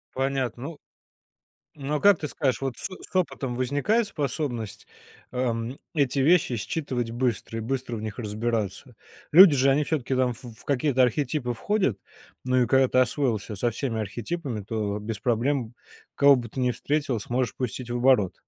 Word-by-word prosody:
Понятно. 130 Hz, -3 st, -1 dB
Ну 155 Hz, +1 st, -6 dB, 1.0 s
ну, 145 Hz, +1 st, -2 dB
а -, -, -3 dB
как 200 Hz, -4 st, +5 dB
ты 150 Hz, -, -3 dB
скажешь, 130 Hz, -1 st, -1 dB
вот 135 Hz, -3 st, -3 dB
с -, -, -4 dB
с 185 Hz, 0 st, -9 dB
опытом 135 Hz, -8 st, -1 dB
возникает 145 Hz, -, +1 dB
способность, 135 Hz, -, -4 dB, 0.5 s
эм, 120 Hz, 0 st, -2 dB, 0.2 s
эти 140 Hz, -3 st, +1 dB
вещи 155 Hz, -2 st, +4 dB
считывать 120 Hz, 0 st, -3 dB
быстро 120 Hz, -1 st, -2 dB
и -, -, -2 dB
быстро 125 Hz, 0 st, -3 dB
в -, -, -5 dB
них 110 Hz, 0 st, -6 dB
разбираться? 110 Hz, +2 st, -3 dB, 0.4 s
Люди 170 Hz, -3 st, +9 dB
же, 135 Hz, +1 st, +4 dB
они 140 Hz, +3 st, +3 dB
всё-таки 140 Hz, -4 st, -1 dB
там, 130 Hz, -1 st, +2 dB
ф 120 Hz, +2 st, -9 dB
в 115 Hz, -2 st, -11 dB
какие-то 135 Hz, -1 st, +2 dB
архетипы 125 Hz, 0 st, 0 dB
входят. 135 Hz, -, 0 dB, 0.5 s
Ну, 130 Hz, 0 st, +3 dB
и -, -, +2 dB
когда 135 Hz, 0 st, +5 dB
ты 130 Hz, -, +1 dB
освоился 120 Hz, -5 st, 0 dB
со 120 Hz, +4 st, +1 dB
всеми 115 Hz, -1 st, -2 dB
архетипами, 120 Hz, -, -4 dB
то 105 Hz, -1 st, -3 dB
без 105 Hz, 0 st, -4 dB
проблем, 120 Hz, +1 st, 0 dB, 0.4 s
кого 140 Hz, -1 st, +6 dB
бы 120 Hz, -2 st, -5 dB
ты 130 Hz, -, -5 dB
ни 125 Hz, -1 st, +2 dB
встретил, 140 Hz, -1 st, -1 dB
сможешь 120 Hz, +1 st, -2 dB
пустить 125 Hz, -1 st, -4 dB
в 120 Hz, -, -1 dB
оборот. 120 Hz, -7 st, +3 dB
125 Hz, 170 wpm, -26 LUFS, 115-140 Hz, 1.0 s, Люди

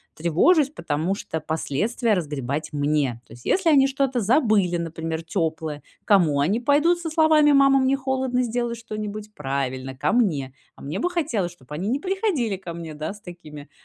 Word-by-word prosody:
тревожусь? 255 Hz, -, +3 dB
Потому 170 Hz, -, -2 dB
что 160 Hz, -4 st, -5 dB
последствия 165 Hz, -, -1 dB
разгребать 150 Hz, -5 st, -3 dB
мне. 145 Hz, -5 st, 0 dB
То -, -, -15 dB
есть, 120 Hz, +1 st, -15 dB
если 375 Hz, -3 st, +2 dB
они 275 Hz, -3 st, +5 dB
что-то 270 Hz, -2 st, 0 dB
забыли, 215 Hz, -, +2 dB
например, 165 Hz, -1 st, -4 dB
тёплое, 160 Hz, -3 st, -3 dB, 0.2 s
к -, -, -48 dB
кому 170 Hz, -8 st, +4 dB
они 185 Hz, +11 st, +1 dB
пойдут 295 Hz, +7 st, +3 dB
со 330 Hz, -, -4 dB
словами: 310 Hz, -2 st, +4 dB
"Мама, 275 Hz, -1 st, +5 dB
мне 265 Hz, +1 st, +2 dB
холодно, 265 Hz, -2 st, -1 dB
сделай 240 Hz, 0 st, -2 dB
что-нибудь." 215 Hz, -2 st, -6 dB
Правильно, 135 Hz, -3 st, -3 dB
ко 130 Hz, -, 0 dB
мне. 160 Hz, -, +1 dB, 0.2 s
А -, -, -17 dB
мне 155 Hz, +8 st, -4 dB
бы 355 Hz, -, 0 dB
хотелось, 265 Hz, -, -1 dB
чтобы 150 Hz, -5 st, -14 dB
они 185 Hz, +6 st, -3 dB
не 265 Hz, +5 st, 0 dB
приходили 370 Hz, -, -1 dB
ко 180 Hz, -3 st, -8 dB
мне, 165 Hz, -2 st, -7 dB
да, 155 Hz, +5 st, -4 dB
с 210 Hz, -, -15 dB
такими, 155 Hz, -5 st, -11 dB
195 Hz, 180 wpm, -23 LUFS, -, 0.2 s, они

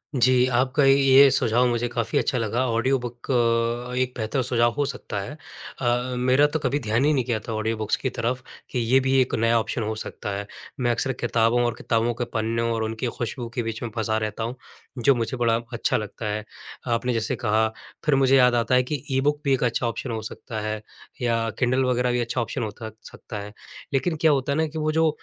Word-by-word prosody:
जी, 125 Hz, 0 st, +4 dB
आपका 130 Hz, +3 st, +2 dB
ये 135 Hz, 0 st, +7 dB
सुझाव 120 Hz, -1 st, +2 dB
मुझे 120 Hz, 0 st, 0 dB
काफ़ी 115 Hz, -1 st, -1 dB
अच्छा 130 Hz, -, 0 dB
लगा, 115 Hz, +3 st, 0 dB
ऑडियो 130 Hz, +4 st, +2 dB
बुक 120 Hz, +1 st, -6 dB
अ, 120 Hz, 0 st, +1 dB
एक 130 Hz, -1 st, 0 dB
बेहतर 115 Hz, +4 st, -1 dB
सुझाव 120 Hz, -1 st, +2 dB
हो 145 Hz, -, +2 dB
सकता 130 Hz, -6 st, -4 dB
है। 100 Hz, -, -6 dB, 0.5 s
अ, 125 Hz, +1 st, 0 dB
मेरा 130 Hz, +3 st, +4 dB
तो 160 Hz, +1 st, -2 dB
कभी 145 Hz, 0 st, 0 dB
ध्यान 115 Hz, +3 st, +1 dB
ही 155 Hz, -, +4 dB
नहीं 130 Hz, -4 st, +1 dB
गया 115 Hz, -3 st, 0 dB
था 115 Hz, -, -3 dB
ऑडियो 110 Hz, +1 st, -1 dB
बुक्स 110 Hz, -1 st, 0 dB
की 130 Hz, -, +1 dB
तरफ, 125 Hz, +2 st, -2 dB, 0.3 s
कि 125 Hz, -, -1 dB
ये 120 Hz, +3 st, +3 dB
भी 135 Hz, 0 st, +3 dB
एक 130 Hz, -, -1 dB
नया 115 Hz, +1 st, +3 dB
ऑप्शन 110 Hz, +1 st, -2 dB
हो 110 Hz, +1 st, -2 dB
सकता -, -, -6 dB
है, 100 Hz, 0 st, -5 dB, 0.3 s
मैं 120 Hz, -1 st, +2 dB
अक्सर 130 Hz, +3 st, 0 dB
किताबों 120 Hz, 0 st, +1 dB
और 120 Hz, -, 0 dB
किताबों 115 Hz, +1 st, 0 dB
के -, -, +1 dB
पन्ने 115 Hz, +1 st, 0 dB
और 115 Hz, -1 st, -1 dB
उनकी 110 Hz, +2 st, -2 dB
खुशबू 120 Hz, +1 st, -3 dB
के 120 Hz, -, 0 dB
बीच 115 Hz, 0 st, -4 dB
में 120 Hz, -, -3 dB
फँसा 110 Hz, -1 st, 0 dB
रहता 110 Hz, +1 st, -3 dB
हूँ, 120 Hz, +3 st, -3 dB, 0.4 s
जो 135 Hz, +3 st, +4 dB
मुझे 120 Hz, +2 st, -2 dB
बड़ा 115 Hz, -1 st, +2 dB, 0.2 s
अच्छा 115 Hz, -, +1 dB
लगता 105 Hz, +1 st, -6 dB
है। 105 Hz, 0 st, -2 dB, 0.5 s
आपने 125 Hz, +2 st, 0 dB
जैसे 110 Hz, -2 st, -1 dB
कहा, 110 Hz, -1 st, +1 dB, 0.4 s
फिर 150 Hz, -, +4 dB
मुझे 135 Hz, 0 st, +4 dB
याद 125 Hz, -1 st, +5 dB
आता 120 Hz, +2 st, +2 dB
है 125 Hz, -, +4 dB
कि 145 Hz, +2 st, -4 dB
ई-बुक 145 Hz, +3 st, +1 dB
भी 140 Hz, -, +3 dB
एक 130 Hz, -, +1 dB
अच्छा 120 Hz, 0 st, +1 dB
ऑप्शन 115 Hz, +2 st, -4 dB
हो 110 Hz, -, -3 dB
सकता 110 Hz, +1 st, -6 dB
है 110 Hz, 0 st, -3 dB, 0.4 s
या 115 Hz, -2 st, +1 dB
किंडल 130 Hz, +1 st, +2 dB
वग़ैरह 125 Hz, 0 st, +1 dB
भी 125 Hz, -, 0 dB
अच्छा 120 Hz, +1 st, -1 dB
ऑप्शन 115 Hz, -, -3 dB
हो 110 Hz, -, -3 dB
त 110 Hz, 0 st, -5 dB, 0.2 s
सकता 105 Hz, -, -8 dB
है, 105 Hz, +1 st, -8 dB, 0.4 s
लेकिन 160 Hz, +5 st, +1 dB
क्या 160 Hz, -, +5 dB
होता 140 Hz, -1 st, 0 dB
है 140 Hz, -, 0 dB
ना 160 Hz, 0 st, +2 dB
कि 155 Hz, -, -8 dB
वो 155 Hz, 0 st, 0 dB
जो 160 Hz, 0 st, +3 dB
120 Hz, 230 wpm, -24 LUFS, 115-130 Hz, 0.5 s, ये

